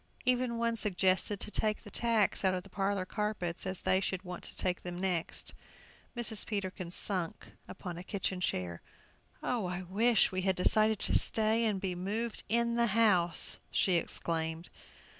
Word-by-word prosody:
Even 250 -1 +1
one 230 0 0
suggested 190 -1 +1
to 210 - -5
take 215 0 -1
the 205 - -12
tacks 230 -5 +2
out 190 -1 +2
of 180 - -4
the 195 - -16
parlor 195 -1 -1
carpets, 200 -4 -3
as 185 -1 -4
they 185 - +2
should 190 -1 -2
want 180 -2 -7
to - - -8
take 180 -1 -1
them 175 0 -6
next. 180 -3 -2 0.6
Mrs. 225 -3 0
Peterkin 190 -4 -4
sunk 180 -1 -2 0.2
upon 175 -2 -7
a - - -8
kitchen 190 -2 -2
chair. 90 - -2 0.6
"Oh, 235 -7 -1
I 180 +1 -4
wish 215 +5 +3
we 185 0 -2
had 190 0 +1
decided 215 +4 +5
to - - +4
stay 220 +1 +3
and 210 -3 0
be 185 -1 -2
moved 210 +6 -3
in 235 +1 +2
the 235 0 +3
house!" 180 -7 +4
she 185 - +2
exclaimed. 165 0 -2
190 Hz, 170 wpm, -32 LUFS, 180-220 Hz, 0.6 s, decided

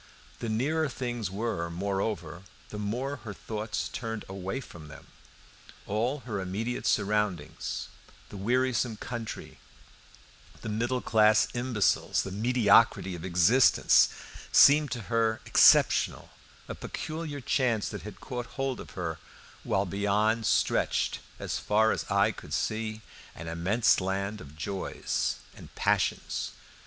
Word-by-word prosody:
The 115 - -3
nearer 145 +8 0
things 120 -4 -3
were, 95 -4 -2
moreover, 90 -2 -3 0.3
the 105 - -6
more 125 +7 -2
her 105 -5 -8
thoughts 110 0 -4
turned 115 -3 -5
away 95 +5 -4
from 85 - -11
them. 75 - -12 0.8
All 120 +7 -1
her 110 -6 -4
immediate 105 +6 -3
surroundings, 100 -6 -1 0.4
the - - -10
wearisome 120 +2 0
country, 115 -1 -7 1.0
the 110 - -5
middle 120 +4 -1
class 110 -1 +4
imbeciles, 120 -4 +1
the 95 - -6
mediocrity 110 -2 +3
of 85 -2 -7
existence, 95 +8 +5 0.4
seemed 150 +1 +7
to 120 -1 -4
her 115 0 0
exceptional, - - +4 0.4
a - - -4
peculiar 155 -2 -5
chance 120 -4 +1
that 105 - -6
had 105 -1 -9
caught 125 -1 -5
hold 135 -2 -1
of - - -11
her, 85 -3 -3 0.4
while 95 +2 +1
beyond 105 +4 +1
stretched, - - +1 0.2
as - - -3
far 110 +1 +3
as - - -3
eye - - +3
could - - -6
see, 110 0 -2 0.3
an 80 - -8
immense 95 +8 +2
land 100 +2 -2
of 75 +2 -13
joys 95 +5 -2 0.2
and - - -14
passions. - - 0
110 Hz, 125 wpm, -29 LUFS, 95-120 Hz, 1.0 s, seemed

